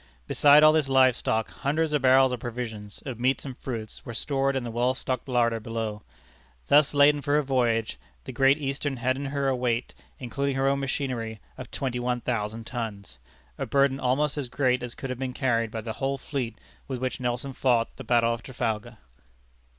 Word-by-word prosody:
Beside 145 - +6
all 155 0 +8
this 155 -3 +1
live 130 -2 +5
stock, 110 0 -1
hundreds 150 +3 -1
of 150 - +2
barrels 130 0 +5
of 125 - -3
provisions, 110 -4 -6
of 130 -4 -5
meats 130 +3 +1
and 130 -2 -6
fruits, 115 -4 -6
were 120 - -7
stored 135 +2 0
in 135 - -1
the 120 - -5
well 120 +3 +1
stocked 130 0 -4
larder 115 -2 +2
below. 110 -1 -4 0.7
Thus 145 0 +5
laden 145 +1 +5
for 145 0 +1
her 150 - +3
voyage, 120 -4 0 0.2
the - - -7
Great 135 +1 +4
Eastern 140 -1 -3
had 130 +1 +1
in 140 +1 -5
her 140 0 -1
a 135 - +2
weight, 125 -1 -1 0.2
including 140 +2 -2
her 135 0 +1
own 140 0 +2
machinery, 130 -5 -3 0.2
of 130 - -9
twenty 125 -3 -3
one 125 0 -1
thousand 115 -2 -3
tons 105 - -6 0.4
a - - -2
burden 140 -1 +2
almost 140 +4 +1
as 130 -4 -4
great 125 -1 +1
as 125 -1 -6
could 135 - -5
have 125 - -5
been 130 -1 -3
carried 115 -4 +1
by 110 0 -5
the 110 0 -5
whole 135 +3 -2
fleet 125 -5 -4 0.3
with 130 - -3
which 130 0 -3
Nelson 125 +2 -2
fought 120 -3 +1
the - - -7
battle 115 -1 +3
of 115 - -6
Trafalgar. 115 -2 -3
130 Hz, 200 wpm, -26 LUFS, 115-135 Hz, 0.7 s, all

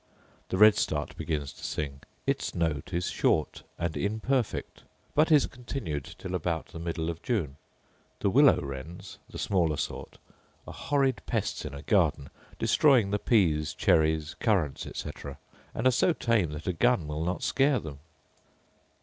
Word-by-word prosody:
The 95 - -1
redstart 105 -8 +4
begins 75 -4 -3
to - - -15
sing: 70 -2 -4 0.2
its - - -1
note 80 -2 -1
is 90 0 -1
short 80 - +1 0.2
and 85 -1 -2
imperfect, 110 +5 -1 0.3
but 155 +3 +3
is 150 -3 +6
continued 120 - -5
till 95 - -6
about 85 -2 -2
the 85 - -9
middle 85 -1 -3
of 85 - -10
June. 85 - -2 0.6
The 100 - +2
willow 140 +4 +6
wrens 75 +7 -8
(the - - -8
smaller 85 -6 +1
sort) - - -5 0.5
are - - -8
horrid 135 -6 0
pests - - -2
in 70 - -6
a 70 - -8
garden, 80 -8 +1 0.3
destroying 125 -10 +4
the 105 - +1
pease, 80 - +2
cherries, 80 0 +2
currants, 95 - 0
etc., 70 -1 -7 0.4
and 115 - -2
are 130 - +6
so 150 +8 +3
tame 115 - +1
that 75 - -7
a 90 - 0
gun 120 -1 +2
will 75 +1 -3
not 90 0 -2
scare 135 -1 +2
them. 75 -3 -8
85 Hz, 155 wpm, -28 LUFS, 75-115 Hz, 0.6 s, is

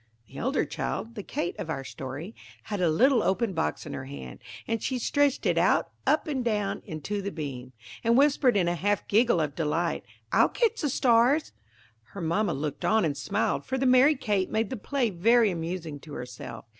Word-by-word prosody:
The 135 - -10
elder 265 +4 0
child, 230 - -4
the 215 - -6
Kate 175 - -3
of - - -5
our 135 -4 -3
story, 135 - -7 0.3
had 205 -3 -4
a 175 - +3
little 245 - +4
open 195 +2 0
box 160 -1 -2
in - - -6
her 130 - -5
hand, 65 - -9 0.3
and 225 -1 -1
she 260 - -1
stretched 285 +3 +1
it - - +3
out, - - +2 0.2
up 305 - +3
and 275 -5 -2
down, 210 -4 -1
into 165 +7 -4
the 200 - -3
beam, 130 -6 -6 0.3
and 230 +1 +4
whispered 275 -4 +4
in 180 -3 +2
a 175 - +1
half 205 +4 -1
giggle 225 -2 +3
of 150 -3 -1
delight, 165 +3 -1 0.3
"I'll - - +4
catch 465 -3 0
the 295 - 0
stars." 250 +4 +3 0.6
Her 200 - -6
mamma 170 +1 0
looked 145 +1 -4
on 220 -4 +3
and 145 -3 -1
smiled, 200 +9 -1
for 265 - -2
the 265 - 0
merry 255 +4 +6
Kate 205 -7 0
made 220 -1 -1
the - - -2
play 245 +1 -1
very 225 +4 +4
amusing 165 -3 -4
to 150 +1 -12
herself. 125 -2 -8
200 Hz, 200 wpm, -27 LUFS, 160-240 Hz, 0.6 s, merry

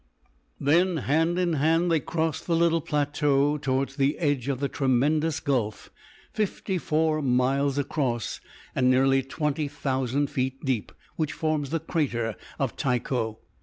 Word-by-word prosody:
Then, 170 +5 +3
hand 160 +5 +1
in 180 -2 +1
hand, 165 +4 +2
they 165 - +4
crossed 160 +2 -2
the 170 - +2
little 165 0 +3
plateau 145 -1 +1
towards 135 0 -1
the 140 +1 +2
edge 145 -6 0
of 135 -3 -1
the 140 - 0
tremendous 145 +4 +1
gulf, 120 -8 -2 0.4
fifty 200 -3 -1
four 155 0 +1
miles 135 +2 +1
across 130 -5 -1 0.3
and 125 -1 +2
nearly 135 +1 +4
twenty 150 +2 -2
thousand 140 -1 -1
feet 130 -2 -2
deep, 130 -6 -1 0.3
which 155 -3 -1
forms 155 -3 -1
the 165 - 0
crater 120 - -1 0.2
of - - -1
Tycho. 120 -3 -1
145 Hz, 140 wpm, -26 LUFS, 130-160 Hz, 0.4 s, they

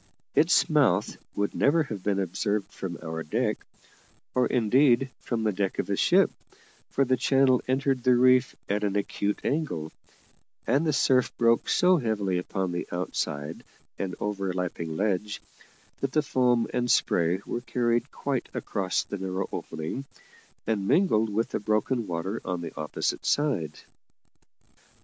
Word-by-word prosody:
Its - - +4
mouth - - +2 0.2
would 100 0 -1
never 155 +3 +3
have 110 -9 -6
been 100 0 0
observed 100 +2 -1
from 85 -3 -5
our 80 0 -4
deck, 110 +7 -1 0.7
or 125 - +3
indeed 125 +2 +3
from 115 -2 -3
the 110 - +2
deck 100 0 -2
of - - -2
a - - +2
ship, - - +4 0.6
for 135 - +1
the 130 0 +2
channel 130 0 +3
entered 135 0 +1
the 125 0 +4
reef 125 +1 +4
at 105 +1 -1
an 100 -1 0
acute 100 0 -1
angle; 90 - -2 0.7
and 140 +7 +2
the - - +3
surf 130 -2 +3
broke 115 0 +3
so 180 0 +4
heavily 105 - 0
upon 95 0 -3
the 85 - -3
outside 80 -3 -3 0.4
and 95 -2 -3
overlapping 90 -5 -3
ledge 105 0 -1 0.6
that 135 -1 -2
the 155 - +3
foam 125 -2 +2
and 125 0 0
spray 85 -3 +2
were 120 - -3
carried 120 -1 0
quite 140 -3 -3
across 95 -3 -1
the 100 - -6
narrow 95 0 -2
opening, 80 - -5 0.6
and 105 -3 -1
mingled 115 - +3
with 110 +3 0
the - - -2
broken 110 +3 0
water 90 +5 -3
on 90 -1 -3
the 85 - -7
opposite 75 -2 -2
side. 100 - 0
105 Hz, 150 wpm, -27 LUFS, 95-125 Hz, 0.7 s, Its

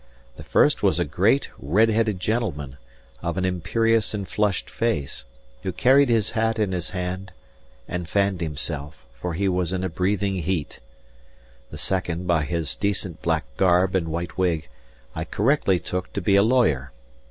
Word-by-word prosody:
The - - -10
first - - +3
was - - +3
a - - +1
great, 115 +10 +2
red 100 - +3
headed 110 -3 +1
gentleman, 85 - -2 0.4
of 85 +1 -3
an 95 - +1
imperious 105 +5 +1
and 100 -2 -4
flushed 105 -3 0
face, 75 - -2 0.4
who 95 - -2
carried 130 +8 +4
his 110 -3 +2
hat 115 0 +1
in 105 -3 +1
his 90 -3 -3
hand 95 +1 -4 0.6
and 90 -2 -4
fanned 100 -2 +1
himself, 75 -1 -5
for 80 +8 -4
he 100 +3 0
was 90 -2 0
in 95 0 -1
a 95 - -1
breathing 95 +3 0
heat. 85 -2 -2 0.9
The - - -8
second, 90 -2 -2
by 85 -4 +2
his 85 -2 -2
decent 95 -4 -2
black 80 -6 0
garb 90 0 +3
and 90 -4 +1
white 85 +1 -4
wig, 85 -7 0 0.4
I - - -3
correctly 105 -4 +2
took 90 +1 -4
to - - -1
be 100 +2 +3
a 100 - +7
lawyer. 100 - +2
90 Hz, 165 wpm, -24 LUFS, 85-105 Hz, 0.9 s, a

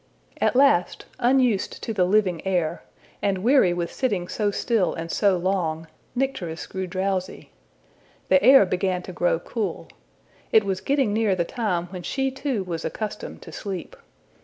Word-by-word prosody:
At - - +2
last, 265 -10 +3
unused 245 -4 +2
to 225 - -3
the 185 -4 +2
living 185 -3 +1
air, 175 -4 -1 0.4
and 195 -2 0
weary 250 -6 +5
with 175 -1 -2
sitting 200 -10 -1
so 205 +3 -1
still 210 -1 0
and 165 0 -5
so 200 -3 +3
long, 170 -3 -1 0.3
Nycteris 245 -11 -2
grew 190 -1 -5
drowsy. 185 0 -3 0.8
The 280 - +5
air 265 -4 +8
began 185 0 -1
to 185 - -8
grow 175 -1 +1
cool. 215 +3 -4 0.6
It 220 - +6
was 190 -1 -2
getting 270 -5 +1
near 215 -3 +2
the 170 -2 0
time 180 -5 -1
when 180 -2 -6
she 270 +8 -1
too 265 -6 -2
was 170 -3 -5
accustomed 215 -1 -5
to - - -10
sleep. 190 -4 -6
195 Hz, 160 wpm, -24 LUFS, 180-230 Hz, 0.8 s, air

